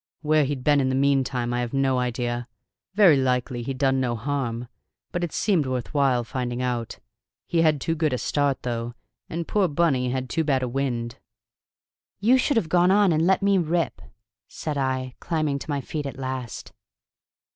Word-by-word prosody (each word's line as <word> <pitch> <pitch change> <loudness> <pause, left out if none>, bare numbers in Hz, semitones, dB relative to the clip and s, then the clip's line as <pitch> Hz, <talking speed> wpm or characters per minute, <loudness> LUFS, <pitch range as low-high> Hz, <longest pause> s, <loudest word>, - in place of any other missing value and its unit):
Where 155 -1 +3
he'd 135 -2 -3
been 145 0 +4
in 130 - +1
the 130 - 0
meantime 135 -3 +1
I 120 - 0
have 120 0 -3
no 135 -1 +2
idea; 120 -1 -2 0.5
very 190 -8 +6
likely 125 -1 0
he'd 130 +2 -4
done 135 -1 +2
no 120 -2 0
harm; 120 -1 -3 0.4
but 175 - -2
it 170 - -2
seemed 175 -10 +1
worth 130 0 -3
while 135 -4 +2
finding 120 0 -3
out. 120 -3 -2 0.5
He 170 - +1
had 155 -3 +3
too 165 - -1
good 155 -2 0
a 125 - 0
start, 140 0 0
though, 120 -1 -3 0.3
and 165 0 -4
poor 205 -3 +2
Bunny 145 -5 +1
had 130 0 -2
too 160 +5 0
bad 135 -4 +1
a - - 0
wind." 120 -2 -3 1.0
"You 245 +6 +4
should 285 0 +1
have 190 - +1
gone 175 +2 +3
on 200 -1 +4
and 160 +1 +2
let 190 +1 +3
me 200 -1 +4
rip," 165 -2 -1 0.5
said 155 -2 -5
I, 130 -2 -1
climbing 155 -4 -1
to - - -9
my 145 -1 -1
feet 145 +2 -4
at 135 - -7
last. 130 -3 -5
135 Hz, 190 wpm, -24 LUFS, 125-160 Hz, 1.0 s, very